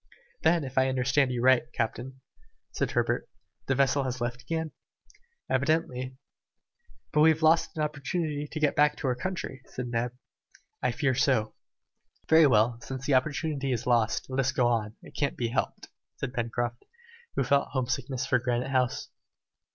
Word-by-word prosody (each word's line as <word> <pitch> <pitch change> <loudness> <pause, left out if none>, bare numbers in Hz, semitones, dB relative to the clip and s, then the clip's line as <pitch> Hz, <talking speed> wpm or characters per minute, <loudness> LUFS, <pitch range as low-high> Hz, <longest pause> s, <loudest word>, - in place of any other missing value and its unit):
"Then, 170 -2 +3
if 130 -1 -1
I 130 0 +3
understand 130 +1 +2
you 120 -1 -2
right, 125 -2 +4
captain," 130 +3 -3 0.5
said - - -1
Herbert, - - 0 0.4
"the 135 - +2
vessel 140 +1 +3
has 130 -1 -3
left 120 0 -3
again?" 160 +4 -3 0.8
"Evidently." 130 -2 0 1.0
"And 150 - +4
we 160 - +7
have 160 0 +1
lost 160 +1 +3
an 155 - +1
opportunity 150 0 -2
to 155 - -4
get 150 -2 +2
back 150 0 +4
to 140 - -3
our 125 - +2
country?" 150 -1 -4
said 125 -1 -5
Neb. 120 +1 -1 0.7
"I 125 - +2
fear 130 +2 +1
so." 130 -5 +2 0.7
"Very 160 -1 +7
well, 115 -1 +3
since 130 0 -6
the 145 - +2
opportunity 140 +1 0
is 120 -1 -2
lost, 120 -3 +2
let 130 0 -3
us 135 0 +2
go 125 - +2
on, 110 -2 -1
it - - -12
can't 140 -2 -1
be 120 -2 -1
helped," 115 - -2 0.3
said 130 -2 -5
Pencroft, 120 0 -2 0.5
who - - +2
felt 140 0 +2
home 130 -2 -1
sickness 130 0 -2
for 130 -6 +2
Granite 125 +1 -1
House. 125 -2 0
130 Hz, 170 wpm, -28 LUFS, 125-145 Hz, 1.0 s, we